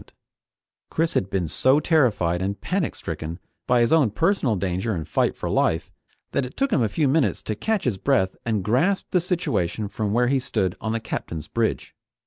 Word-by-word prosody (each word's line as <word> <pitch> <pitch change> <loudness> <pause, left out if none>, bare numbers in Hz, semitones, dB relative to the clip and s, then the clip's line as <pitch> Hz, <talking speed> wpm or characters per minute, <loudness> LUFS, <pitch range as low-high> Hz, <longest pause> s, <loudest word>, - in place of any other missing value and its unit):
Chris 165 +1 0
had 95 - 0
been 95 -4 -1
so 130 - +3
terrified 115 - +2
and 100 +2 -2
panicstricken 130 - -3 0.3
by 125 -1 +4
his 120 +5 +3
own 150 -8 +5
personal 155 - +1
danger 95 +3 -1
and 80 -3 -4
fight - - +1
for - - -4
life 80 0 +1 0.4
that 140 - 0
it 125 - -8
took 275 -1 +1
him - - +3
a 110 - +2
few 145 +7 +1
minutes 140 +1 +1
to 110 - -2
catch 215 - -1
his 110 -7 -1
breath 95 -9 +1
and 110 -5 -1
grasp 150 - +2
the 180 - +3
situation 140 - -1
from 105 0 -3
where 120 +3 +3
he 135 +1 +2
stood 105 -8 -1
on 110 - -2
the 115 - 0
Captain's 80 -7 -5
bridge. - - -1
115 Hz, 190 wpm, -24 LUFS, 95-150 Hz, 0.4 s, own